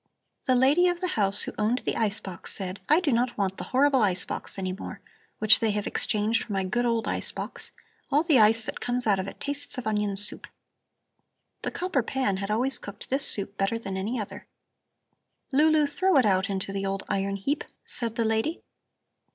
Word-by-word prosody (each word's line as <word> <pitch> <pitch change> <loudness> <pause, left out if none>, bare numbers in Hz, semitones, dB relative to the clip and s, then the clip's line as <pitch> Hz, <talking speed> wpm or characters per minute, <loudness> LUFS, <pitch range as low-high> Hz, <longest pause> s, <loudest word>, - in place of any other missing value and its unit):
The 255 - +3
lady 280 +8 +4
of 350 -1 0
the 365 0 -1
house 200 - +2
who - - -5
owned 225 +4 0
the - - 0
ice 210 -2 0
box 180 -3 -6
said: 190 0 -3
'I 310 +4 +5
do 310 -6 +1
not 240 +1 0
want 195 -2 -1
the - - -5
horrible 270 0 +3
ice 185 -3 +2
box - - -5
any 185 -1 -2
more, 190 - -8 0.4
which 215 0 +6
they 225 - +1
have 210 -1 -2
exchanged 215 +2 +1
for 210 - -6
my 195 -1 0
good 240 +6 -1
old 230 -1 0
ice - - -1
box. - - -5 0.4
All 290 +3 +3
the 310 -7 +4
ice 220 +1 +5
that - - -6
comes 245 0 -1
out 200 -3 +3
of 190 - -3
it - - -8
tastes 285 -1 -3
of 255 - -5
onion 210 -2 0
soup.' 205 +1 +1 1.1
The - - -2
copper 360 -7 -1
pan 235 -5 -1
had 195 +1 -4
always 245 +4 +2
cooked 200 +4 -9
this 275 +1 +2
soup 200 0 +1
better 195 +4 +1
than 195 -4 -6
any 215 +6 -2
other. 210 - -7 1.0
'Lulu, 305 +2 +4
throw 325 +4 +2
it 255 - +5
out 190 -2 +3
to 195 -1 -3
the 195 0 -2
old 195 0 -2
iron 195 0 -1
heap,' 275 +10 -2 0.2
said 230 -2 0
the 230 - 0
lady. 225 +9 -1
220 Hz, 210 wpm, -26 LUFS, 195-265 Hz, 1.1 s, which